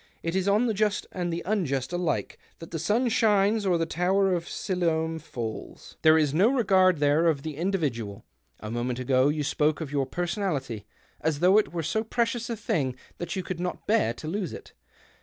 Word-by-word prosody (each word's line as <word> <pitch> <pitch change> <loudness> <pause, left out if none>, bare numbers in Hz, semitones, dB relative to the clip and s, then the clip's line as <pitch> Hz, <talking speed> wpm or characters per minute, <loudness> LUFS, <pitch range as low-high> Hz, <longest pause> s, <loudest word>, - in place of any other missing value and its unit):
It 165 +2 -2
is 190 0 0
on 210 +4 +3
the 230 - +1
just 210 0 0
and 175 -2 -2
the 170 +1 -3
unjust 165 - -1
alike 175 -2 -2 0.2
that 165 - -11
the 165 - -3
sun 215 +10 +1
shines 210 -2 +3
or 180 -2 +3
the 165 - 0
tower 185 +4 +1
of 170 -1 -2
Siloam 165 -3 -1
falls. 120 -7 -7
There 155 0 +6
is 150 -3 +2
no 190 +9 +4
regard 190 - +4
there 145 +3 +3
of 145 -4 +1
the 155 -2 -5
individual. 140 - -2 0.4
A 105 - -6
moment 120 +1 -2
ago 130 +1 +2
you 150 0 -1
spoke 150 +1 +1
of 155 -4 -5
your 140 -2 0
personality 165 - -3 0.3
as 155 -2 -1
though 185 +5 +6
it 215 - -1
were 170 -1 -3
so 220 +8 0
precious 235 +1 -1
a 230 - -3
thing 135 -10 -1 0.2
that 175 +1 -4
you 190 - -2
could 180 -1 -5
not 180 0 -4
l^ear 210 - +2
to 155 - -8
lose 185 +1 -3
it. - - -10
170 Hz, 200 wpm, -27 LUFS, 145-195 Hz, 0.4 s, There